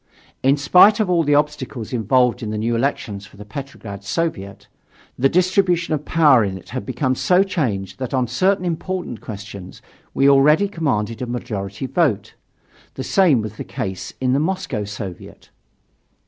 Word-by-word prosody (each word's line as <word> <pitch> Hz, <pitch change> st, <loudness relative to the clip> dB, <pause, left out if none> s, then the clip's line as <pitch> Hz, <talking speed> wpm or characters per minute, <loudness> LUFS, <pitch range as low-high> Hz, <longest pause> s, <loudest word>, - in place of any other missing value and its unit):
In 135 Hz, +2 st, +3 dB
spite 185 Hz, +9 st, +6 dB
of 205 Hz, -4 st, +1 dB
all 170 Hz, -2 st, +3 dB
the 145 Hz, -2 st, +2 dB
obstacles 145 Hz, -6 st, -2 dB
involved 125 Hz, +2 st, +2 dB
in 110 Hz, -, -4 dB
the 105 Hz, -, -3 dB
new 115 Hz, +2 st, 0 dB
elections 115 Hz, -5 st, -2 dB
for 100 Hz, -, -19 dB
the 105 Hz, -, -10 dB
Petrograd 105 Hz, -4 st, -8 dB
Soviet, 100 Hz, -, -3 dB, 0.5 s
the 135 Hz, +2 st, +2 dB
distribution 180 Hz, -1 st, +2 dB
of 150 Hz, -1 st, -2 dB
power 145 Hz, -8 st, +5 dB
in 95 Hz, -2 st, -3 dB
it 95 Hz, -, -14 dB
had 130 Hz, -, -5 dB
become 130 Hz, +1 st, 0 dB
so 180 Hz, +9 st, +3 dB
changed 125 Hz, -, -3 dB
that 130 Hz, -2 st, -4 dB
on 130 Hz, -2 st, +1 dB
certain 185 Hz, -, +1 dB
important 175 Hz, -, -4 dB
questions 100 Hz, -4 st, -9 dB, 0.4 s
we 135 Hz, -, +4 dB
already 150 Hz, +8 st, +5 dB
commanded 125 Hz, -, -2 dB
a 125 Hz, -, -3 dB
majority 110 Hz, -3 st, -4 dB
vote. 120 Hz, -, 0 dB, 0.6 s
The 130 Hz, -, -4 dB
same 165 Hz, -, +3 dB
was 110 Hz, 0 st, -7 dB
the -, -, -5 dB
case 95 Hz, -2 st, -5 dB
in 130 Hz, -1 st, +1 dB
the 135 Hz, -, +2 dB
Moscow 155 Hz, -, -2 dB
Soviet. 100 Hz, -4 st, -9 dB
130 Hz, 165 wpm, -20 LUFS, 105-160 Hz, 0.6 s, spite